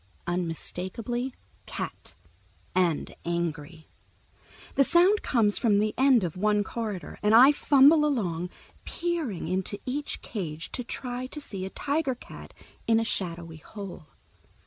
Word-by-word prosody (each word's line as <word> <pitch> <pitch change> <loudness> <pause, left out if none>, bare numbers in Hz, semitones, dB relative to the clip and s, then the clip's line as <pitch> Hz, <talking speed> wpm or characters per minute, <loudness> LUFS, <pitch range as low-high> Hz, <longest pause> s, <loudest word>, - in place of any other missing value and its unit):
Unmistakably 185 +8 -3 0.3
Cat, - - -6 0.6
and 175 -4 +1
angry. 165 -2 -3 0.9
The 275 - +5
sound 355 +8 +4
comes 215 -5 +2
from 215 -4 +3
the 210 +1 +1
end 260 -5 +5
of 170 -3 -3
one 210 +2 +2
corridor, 210 -4 -5
and 210 +1 +4
I 260 +5 +9
fumble 290 +1 +5
along, 180 - 0 0.3
peering 330 - -2
into 190 +3 -1
each 280 +3 -3
cage 160 -7 -5
to 250 - -3
try 250 +1 -5
to 300 - -7
see 195 -9 -6
a - - -6
tiger 285 +3 -1
cat - - -12 0.4
in 225 0 +4
a - - +1
shadowy 170 -6 -2
hole. 185 -1 -9
210 Hz, 130 wpm, -27 LUFS, 175-260 Hz, 0.9 s, I